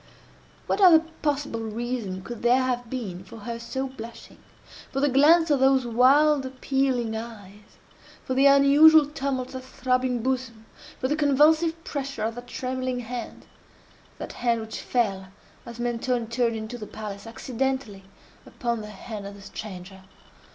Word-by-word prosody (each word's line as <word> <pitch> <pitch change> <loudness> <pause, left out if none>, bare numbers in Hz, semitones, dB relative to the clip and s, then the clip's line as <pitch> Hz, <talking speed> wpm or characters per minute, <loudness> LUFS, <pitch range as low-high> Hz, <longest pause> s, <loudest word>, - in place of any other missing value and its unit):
What - - -1
other 335 -4 +8 0.2
possible 290 -5 -1
reason 225 -4 -4
could 240 +1 -8
there 250 +2 +4
have 245 -2 -2
been 200 -8 -5
for 190 +4 -12
her 235 +2 -5
so 265 +3 -4
blushing?—for 245 +2 -10
the 285 - +3
glance 310 +5 +5
of 285 - +3
those 265 -1 +4
wild 270 +5 +4
appealing 260 -3 -1
eyes?—for 210 +2 -10
the 270 +2 +5
unusual 285 +3 +7
tumult 275 -3 -3
of 260 - -7
that 260 - -16
throbbing 255 -2 -1
bosom?—for 255 -1 -4
the 295 - 0
convulsive 310 +3 +3
pressure 275 -5 -4
of 225 +1 -1
that 245 +1 -9
trembling 255 -1 -3
hand?—that 240 0 -10
hand 235 -2 0
which 220 0 -6
fell, 195 -6 -1 0.4
as 235 0 -8
Mentoni 240 0 -1
turned 230 0 0
into 220 +2 -6
the 210 - -7
palace, 210 -1 -8
accidentally, 245 -3 -3 0.4
upon 235 -3 -3
the 210 - -8
hand 210 0 -8
of 200 - -9
the 200 - -13
stranger. 190 -2 -9
245 Hz, 145 wpm, -25 LUFS, 225-270 Hz, 0.4 s, other